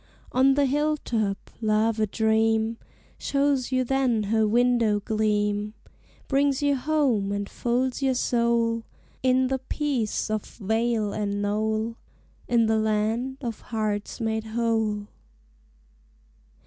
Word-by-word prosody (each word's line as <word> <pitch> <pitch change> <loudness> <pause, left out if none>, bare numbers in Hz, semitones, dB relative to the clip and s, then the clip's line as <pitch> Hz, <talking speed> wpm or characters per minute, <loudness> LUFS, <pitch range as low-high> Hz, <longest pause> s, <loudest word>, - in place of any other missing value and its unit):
On 265 +1 +4
the 285 0 +3
hill 295 +3 +1
top 215 -7 -2
Love 220 +1 +1
a 215 - +2
Dream 220 +1 +1 0.4
Shows 275 -2 0
you 255 0 +2
then 255 -4 +1
her 220 -1 +3
window 235 -2 +3
gleam; 210 0 0 0.5
Brings 280 0 +1
you 285 -1 +3
home 260 -8 +1
and 200 0 -2
folds 250 +4 -1
your 265 -1 +2
soul 235 -2 +1 0.4
In 260 0 +3
the 265 +1 -1
peace 260 -6 -2
of 215 -1 -1
vale 220 0 -1
and 205 -1 -2
knoll, 215 +2 -1 0.5
In 235 -1 +3
the 220 0 +2
Land 220 +4 0
of 235 -4 -5
Hearts 215 -2 -3
Made 220 -1 -1
Whole. 220 -2 0
225 Hz, 120 wpm, -25 LUFS, 215-255 Hz, 0.5 s, On